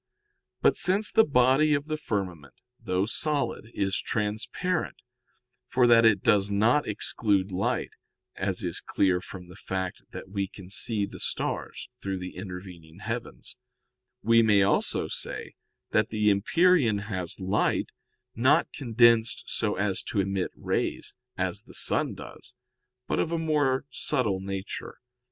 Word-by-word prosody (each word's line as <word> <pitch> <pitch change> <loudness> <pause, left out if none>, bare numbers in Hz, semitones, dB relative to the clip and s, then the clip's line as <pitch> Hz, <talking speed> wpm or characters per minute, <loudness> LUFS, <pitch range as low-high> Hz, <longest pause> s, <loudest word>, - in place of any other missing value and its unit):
But - - +5
since 195 +4 +2
the 225 - +6
body 140 - +4
of 145 0 -2
the 155 0 -2
firmament, 90 - -4 0.2
though 95 -4 0
solid, 145 -2 -1
is 95 -3 -1
transparent, 110 - -2 0.7
for 125 -1 +3
that 115 -1 +6
it 105 -4 +4
does 100 -3 +3
not 110 +8 +2
exclude 100 -2 0
light 95 +2 -1 0.4
(as 95 0 -2
is 85 -2 -3
clear 90 -2 +1
from 90 -1 -10
the 90 - -13
fact 95 -4 -4
that - - -8
we 100 0 -2
can 95 -1 -13
see 105 0 0
the - - -10
stars - - -3
through 95 -1 -3
the 90 0 -7
intervening 90 -3 -9
heavens), 115 +4 -6 0.7
we 115 +2 +5
may 105 -3 +5
also 100 - +1
say - - -5 0.4
that 110 0 +2
the 105 -1 +2
empyrean 120 - +3
has 90 -1 -4
light, 95 +2 0 0.4
not 130 +5 +3
condensed 115 -3 +3
so 105 -2 0
as 100 -1 0
to 105 - -3
emit 95 -1 0
rays, - - -2 0.2
as - - -2
the - - -14
sun - - +1
does, - - -11 0.5
but - - -1
of 165 - 0
a 170 - 0
more 150 -5 +1
subtle 125 -8 0
nature. 95 +1 -6
105 Hz, 140 wpm, -27 LUFS, 95-125 Hz, 0.7 s, the